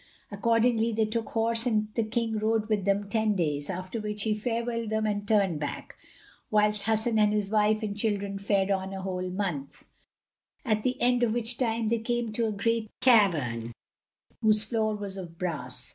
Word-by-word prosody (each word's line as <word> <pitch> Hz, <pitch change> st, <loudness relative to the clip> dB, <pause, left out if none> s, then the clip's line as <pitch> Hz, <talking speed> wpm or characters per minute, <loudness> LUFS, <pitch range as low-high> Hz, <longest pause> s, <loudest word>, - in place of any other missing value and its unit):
Accordingly 230 Hz, +2 st, +2 dB
they 220 Hz, 0 st, +2 dB
took 225 Hz, +1 st, -2 dB
horse 230 Hz, +1 st, +1 dB
and 215 Hz, -2 st, +1 dB
the 230 Hz, -, +1 dB
King 225 Hz, 0 st, -1 dB
rode 220 Hz, 0 st, 0 dB
with 205 Hz, -3 st, 0 dB
them 200 Hz, 0 st, +1 dB
ten 215 Hz, 0 st, +1 dB
days, 145 Hz, -5 st, -1 dB
after 185 Hz, +4 st, -4 dB
which 210 Hz, -1 st, -2 dB
he 220 Hz, -, +1 dB
farewelled 230 Hz, +1 st, -2 dB
them 220 Hz, 0 st, 0 dB
and 205 Hz, -1 st, -2 dB
turned 195 Hz, -7 st, +2 dB
back, 145 Hz, -1 st, -5 dB, 0.5 s
whilst 210 Hz, -1 st, +2 dB
Hasan 220 Hz, +1 st, +1 dB
and 210 Hz, -1 st, +4 dB
his 210 Hz, -1 st, -1 dB
wife 215 Hz, 0 st, +2 dB
and 205 Hz, -1 st, -3 dB
children 200 Hz, -2 st, -1 dB
fared 200 Hz, -1 st, +1 dB
on 190 Hz, 0 st, -1 dB
a 190 Hz, -, -6 dB
whole 185 Hz, -1 st, -3 dB
month, 180 Hz, -8 st, -4 dB, 0.8 s
at 215 Hz, -3 st, +1 dB
the 255 Hz, +3 st, -1 dB
end 245 Hz, 0 st, +3 dB
of 230 Hz, -3 st, +2 dB
which 240 Hz, 0 st, +1 dB
time 230 Hz, -3 st, 0 dB
they 230 Hz, 0 st, +1 dB
came 240 Hz, 0 st, -2 dB
to 225 Hz, +1 st, 0 dB
a -, -, -1 dB
great 220 Hz, +2 st, -1 dB
cavern, 150 Hz, -, +3 dB, 0.7 s
whose 215 Hz, -1 st, +4 dB
floor 220 Hz, -1 st, 0 dB
was 200 Hz, -2 st, -5 dB
of 170 Hz, -3 st, -8 dB
brass. 150 Hz, -9 st, -5 dB
215 Hz, 185 wpm, -28 LUFS, 195-225 Hz, 0.8 s, and